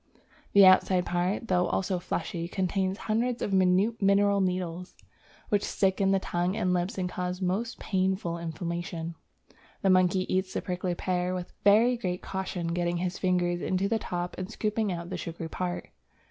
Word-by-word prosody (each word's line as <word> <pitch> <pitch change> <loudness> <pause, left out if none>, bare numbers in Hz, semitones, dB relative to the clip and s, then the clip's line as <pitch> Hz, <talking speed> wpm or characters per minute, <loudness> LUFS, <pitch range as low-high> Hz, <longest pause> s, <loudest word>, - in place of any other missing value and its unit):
The 200 -1 +8
outside 185 -1 +5
part, 180 +6 -1
though 180 -2 +2
also 185 -1 -1
fleshy, 170 -1 -3
contains 190 +1 -1
hundreds 235 +3 -1
of 200 - -2
minute 190 +4 +3
mineral 200 0 +4
needles, 180 -1 -2 0.5
which 205 -1 +2
stick 190 0 +1
in 195 - +3
the 195 - +4
tongue 180 0 -1
and 180 -3 +1
lips 180 +3 -1
and 185 -1 -1
cause 180 0 -3
most 195 +6 -1
painful 185 -3 -1
inflammation. 170 0 -4 0.7
The 195 - +4
monkey 185 0 +3
eats 185 0 -1
the - - 0
prickly 180 -1 -2
pear 180 0 -1
with 180 0 -6
very 225 +5 +5
great 180 -5 -3
caution, 190 -2 -4
getting 175 0 0
his 180 +1 -3
fingers 175 -1 +1
into 190 +1 0
the 225 +1 0
top 175 -3 -4
and 185 +1 -4
scooping 215 -1 -1
out 170 0 -5
the 180 - -2
sugary 165 0 -6
part. 180 0 -4
185 Hz, 170 wpm, -28 LUFS, 175-195 Hz, 0.7 s, The